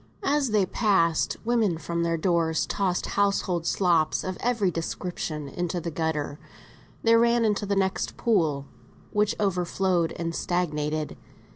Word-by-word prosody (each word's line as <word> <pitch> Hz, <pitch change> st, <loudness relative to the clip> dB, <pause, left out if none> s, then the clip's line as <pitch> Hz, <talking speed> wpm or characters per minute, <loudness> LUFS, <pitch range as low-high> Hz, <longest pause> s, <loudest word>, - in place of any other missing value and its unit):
As 290 Hz, -6 st, +2 dB
they 210 Hz, -3 st, +3 dB
passed, 185 Hz, -5 st, +2 dB
women 225 Hz, -7 st, +2 dB
from 170 Hz, +2 st, -3 dB
their 165 Hz, 0 st, +1 dB
doors 165 Hz, -1 st, +1 dB
tossed 190 Hz, -3 st, -1 dB
household 195 Hz, -4 st, 0 dB
slops 170 Hz, -5 st, +2 dB
of 185 Hz, 0 st, -3 dB
every 230 Hz, -6 st, +1 dB
description 165 Hz, -3 st, -4 dB
into 175 Hz, +4 st, -3 dB
the 170 Hz, 0 st, -4 dB
gutter; 155 Hz, -2 st, -2 dB, 0.6 s
they 230 Hz, 0 st, +5 dB
ran 235 Hz, 0 st, +4 dB
into 210 Hz, -1 st, 0 dB
the 200 Hz, -, +1 dB
next 190 Hz, -1 st, -1 dB
pool, 160 Hz, -11 st, +1 dB, 0.5 s
which 210 Hz, 0 st, +1 dB
overflowed 180 Hz, -3 st, +1 dB
and 165 Hz, 0 st, -3 dB
stagnated. 155 Hz, -4 st, -2 dB
180 Hz, 135 wpm, -26 LUFS, 165-205 Hz, 0.6 s, they